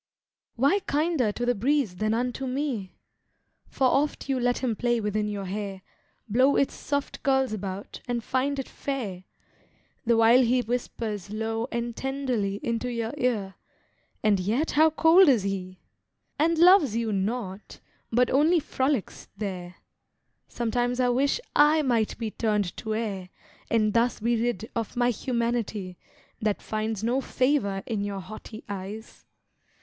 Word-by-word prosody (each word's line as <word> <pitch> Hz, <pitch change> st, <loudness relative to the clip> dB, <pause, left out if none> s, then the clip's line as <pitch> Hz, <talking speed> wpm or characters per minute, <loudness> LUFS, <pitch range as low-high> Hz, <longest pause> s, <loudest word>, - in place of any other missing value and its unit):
Why 280 Hz, -, +3 dB
kinder 295 Hz, -6 st, +1 dB
to 240 Hz, -, -2 dB
the 245 Hz, -, +3 dB
breeze 245 Hz, -3 st, 0 dB
than 215 Hz, +3 st, +1 dB
unto 250 Hz, +2 st, -2 dB
me? 255 Hz, -8 st, -3 dB, 0.7 s
For 265 Hz, -, 0 dB
oft 285 Hz, +3 st, 0 dB
you 265 Hz, -1 st, +1 dB
let 245 Hz, 0 st, +1 dB
him 245 Hz, -4 st, -1 dB
play 240 Hz, +1 st, +1 dB
within 210 Hz, 0 st, -1 dB
your 205 Hz, -2 st, -4 dB
hair, 195 Hz, 0 st, -5 dB, 0.4 s
Blow 255 Hz, +6 st, +4 dB
its 275 Hz, -, +2 dB
soft 285 Hz, -1 st, -3 dB
curls 265 Hz, -3 st, +2 dB
about, 195 Hz, -1 st, -6 dB
and 240 Hz, -1 st, -2 dB
find 270 Hz, +4 st, 0 dB
it 270 Hz, -, -4 dB
fair, 210 Hz, -10 st, -5 dB, 0.8 s
The 235 Hz, -1 st, +4 dB
while 230 Hz, +3 st, +6 dB
he 250 Hz, 0 st, +2 dB
whispers 220 Hz, -4 st, -3 dB
low 225 Hz, +2 st, -2 dB
and 235 Hz, 0 st, -3 dB
tenderly 255 Hz, -7 st, -1 dB
Into 235 Hz, +1 st, -1 dB
your 230 Hz, +1 st, -3 dB
ear; 225 Hz, -8 st, -1 dB, 0.7 s
and 205 Hz, -3 st, +3 dB
yet 225 Hz, -, 0 dB
how 315 Hz, +2 st, +5 dB
cold 325 Hz, +3 st, +6 dB
is 235 Hz, -7 st, +4 dB
he! 185 Hz, -2 st, -4 dB, 0.6 s
And 330 Hz, +2 st, +3 dB
loves 345 Hz, -, +6 dB
you 230 Hz, -2 st, 0 dB
not, 200 Hz, 0 st, -3 dB, 0.3 s
but 245 Hz, +2 st, +3 dB
only 315 Hz, +6 st, +4 dB
frolics 270 Hz, -5 st, -2 dB
there; 185 Hz, -4 st, -5 dB, 0.7 s
Sometimes 245 Hz, +1 st, -1 dB
I 250 Hz, -1 st, +3 dB
wish 275 Hz, -, +2 dB, 0.2 s
I 300 Hz, +1 st, +5 dB
might 235 Hz, -5 st, +1 dB
be 225 Hz, -2 st, -3 dB
turned 210 Hz, -5 st, 0 dB
to 220 Hz, -1 st, -3 dB
air, 200 Hz, -5 st, -3 dB, 0.4 s
And 215 Hz, -2 st, +2 dB
thus 235 Hz, +1 st, +2 dB
be 235 Hz, +2 st, +1 dB
rid 235 Hz, -2 st, -1 dB
of 230 Hz, 0 st, -3 dB
my 245 Hz, 0 st, +3 dB
humanity, 230 Hz, -6 st, -2 dB, 0.4 s
That 210 Hz, -2 st, -1 dB
finds 215 Hz, -1 st, -3 dB
no 245 Hz, +4 st, +1 dB
favour 255 Hz, -9 st, 0 dB
in 215 Hz, -4 st, -2 dB
your 200 Hz, -1 st, -3 dB
haughty 215 Hz, +3 st, -9 dB
eyes. 205 Hz, +3 st, -7 dB
235 Hz, 150 wpm, -26 LUFS, 210-260 Hz, 0.8 s, while